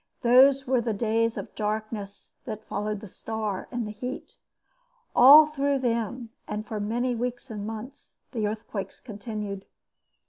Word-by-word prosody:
Those 265 Hz, +3 st, +6 dB
were 255 Hz, -1 st, +2 dB
the 225 Hz, -2 st, -1 dB
days 230 Hz, +1 st, +1 dB
of -, -, -6 dB
darkness 210 Hz, -1 st, -4 dB
that 215 Hz, -4 st, -6 dB
followed 210 Hz, 0 st, -3 dB
the 215 Hz, -, -8 dB
star 215 Hz, 0 st, -4 dB
and 240 Hz, -2 st, -3 dB
the 210 Hz, -, -5 dB
heat. 250 Hz, +6 st, -6 dB, 0.8 s
All 290 Hz, +5 st, +10 dB
through 285 Hz, -2 st, 0 dB
them, 235 Hz, -1 st, -2 dB, 0.2 s
and 210 Hz, +1 st, -4 dB
for 215 Hz, 0 st, -4 dB
many 240 Hz, +4 st, 0 dB
weeks 245 Hz, +1 st, -4 dB
and 210 Hz, -1 st, -5 dB
months, 225 Hz, +6 st, -9 dB
the 220 Hz, -5 st, -1 dB
earthquakes 215 Hz, -2 st, -5 dB
continued. 210 Hz, -3 st, -6 dB
225 Hz, 145 wpm, -27 LUFS, 210-250 Hz, 0.8 s, All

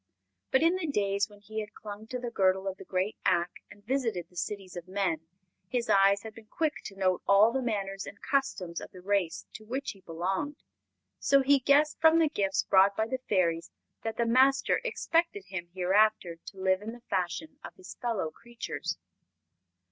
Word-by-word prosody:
But, 265 Hz, +3 st, +3 dB
in 340 Hz, +3 st, +4 dB
the 350 Hz, -3 st, -3 dB
days 200 Hz, -5 st, 0 dB
when 205 Hz, -1 st, -17 dB
he 220 Hz, +1 st, -5 dB
had 215 Hz, -1 st, -7 dB
clung 210 Hz, +1 st, -9 dB
to 250 Hz, -, -4 dB
the 245 Hz, -1 st, -5 dB
girdle 190 Hz, -2 st, +2 dB
of 190 Hz, 0 st, -3 dB
the -, -, -10 dB
great 190 Hz, +3 st, -1 dB
Ak 175 Hz, +1 st, +2 dB, 0.2 s
and 205 Hz, 0 st, -16 dB
visited 230 Hz, -8 st, -1 dB
the -, -, -22 dB
cities 190 Hz, +1 st, -4 dB
of 175 Hz, 0 st, -7 dB
men, 185 Hz, -5 st, -1 dB, 0.4 s
his 245 Hz, -2 st, 0 dB
eyes 195 Hz, +1 st, +5 dB
had 220 Hz, -1 st, -8 dB
been 220 Hz, 0 st, -14 dB
quick 310 Hz, +6 st, 0 dB
to 195 Hz, -, -7 dB
note 185 Hz, -2 st, +1 dB
all 200 Hz, +3 st, +6 dB
the 265 Hz, -, -1 dB
manners 195 Hz, -5 st, -2 dB
and 200 Hz, -, -9 dB
customs 265 Hz, -11 st, -1 dB
of -, -, -8 dB
the 185 Hz, -, -13 dB
race 185 Hz, -3 st, 0 dB
to 215 Hz, -, -9 dB
which 260 Hz, +6 st, -3 dB
he 195 Hz, -, -16 dB
belonged; 190 Hz, -, -3 dB, 0.6 s
so 275 Hz, -1 st, +4 dB
he 280 Hz, +1 st, +5 dB
guessed 285 Hz, +3 st, +3 dB
from 320 Hz, 0 st, +7 dB
the 325 Hz, -2 st, +4 dB
gifts 195 Hz, -7 st, 0 dB
brought 195 Hz, +1 st, +4 dB
by 220 Hz, -, +2 dB
the 255 Hz, +3 st, -3 dB
Fairies 170 Hz, -4 st, +1 dB, 0.3 s
that 225 Hz, -1 st, -4 dB
the 235 Hz, -, +2 dB
Master 265 Hz, +3 st, +4 dB
expected 385 Hz, -5 st, 0 dB
him 175 Hz, -3 st, -5 dB
hereafter 190 Hz, -1 st, +2 dB
to 195 Hz, -, -9 dB
live 190 Hz, 0 st, +2 dB
in 220 Hz, +2 st, -6 dB
the 240 Hz, -, -12 dB
fashion 235 Hz, -, -2 dB
of -, -, -9 dB
his 370 Hz, -, -10 dB
fellow 220 Hz, -10 st, -1 dB
creatures. 235 Hz, +5 st, -5 dB
205 Hz, 195 wpm, -29 LUFS, 190-260 Hz, 0.6 s, from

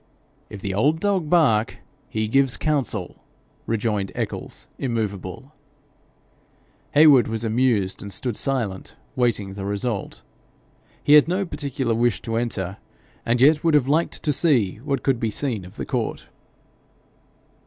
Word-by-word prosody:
'If 105 Hz, -, -9 dB
the 95 Hz, -1 st, -3 dB
old 145 Hz, +11 st, +2 dB
dog 190 Hz, -6 st, 0 dB
bark, 130 Hz, -10 st, +3 dB, 0.3 s
he 110 Hz, 0 st, -1 dB
gives 135 Hz, +2 st, +2 dB
counsel,' 135 Hz, -, -1 dB, 0.5 s
rejoined 105 Hz, -3 st, -1 dB
Eccles, -, -, -5 dB
immovable. 110 Hz, +1 st, -4 dB, 1.4 s
Heywood 145 Hz, -6 st, +7 dB
was 110 Hz, 0 st, -3 dB
amused, 110 Hz, -4 st, +1 dB
and 100 Hz, -, -7 dB
stood 120 Hz, +4 st, -3 dB
silent, 115 Hz, -9 st, -2 dB, 0.2 s
waiting 110 Hz, -6 st, 0 dB
the 100 Hz, 0 st, -6 dB
result. 100 Hz, +1 st, -3 dB, 0.8 s
He 145 Hz, -, +4 dB
had 150 Hz, 0 st, +8 dB
no 185 Hz, +3 st, 0 dB
particular 140 Hz, -6 st, -2 dB
wish 115 Hz, -5 st, +1 dB
to 115 Hz, -, -3 dB
enter, 100 Hz, -5 st, -2 dB, 0.5 s
and 120 Hz, +1 st, +2 dB
yet 150 Hz, +3 st, +5 dB
would 165 Hz, -2 st, +3 dB
have 140 Hz, -3 st, +3 dB
liked 155 Hz, +4 st, 0 dB
to 150 Hz, -, +1 dB
see 125 Hz, -, +2 dB
what 135 Hz, +4 st, -3 dB
could 135 Hz, -4 st, +1 dB
be 115 Hz, -, 0 dB
seen 110 Hz, -4 st, -3 dB
of 90 Hz, -, -13 dB
the -, -, -5 dB
court. -, -, -3 dB
120 Hz, 140 wpm, -23 LUFS, 105-145 Hz, 1.4 s, had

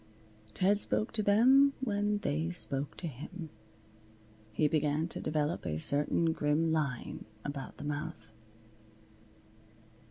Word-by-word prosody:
Ted 200 Hz, +2 st, +3 dB
spoke 215 Hz, -, 0 dB
to 220 Hz, -, -1 dB
them 260 Hz, +7 st, +6 dB
when 210 Hz, -4 st, 0 dB
they 160 Hz, -4 st, -1 dB
spoke 145 Hz, -5 st, -4 dB
to -, -, -6 dB
him. 160 Hz, +3 st, -7 dB, 1.0 s
He 150 Hz, +8 st, +2 dB
began 150 Hz, +1 st, +1 dB
to -, -, -6 dB
develop 155 Hz, +1 st, -1 dB
a 75 Hz, -, -2 dB
certain 150 Hz, -, +2 dB
grim 155 Hz, +2 st, +1 dB
line 145 Hz, -6 st, -2 dB, 0.2 s
about 140 Hz, -2 st, -5 dB
the -, -, -8 dB
mouth. 145 Hz, -6 st, -5 dB
160 Hz, 120 wpm, -32 LUFS, 145-200 Hz, 1.0 s, them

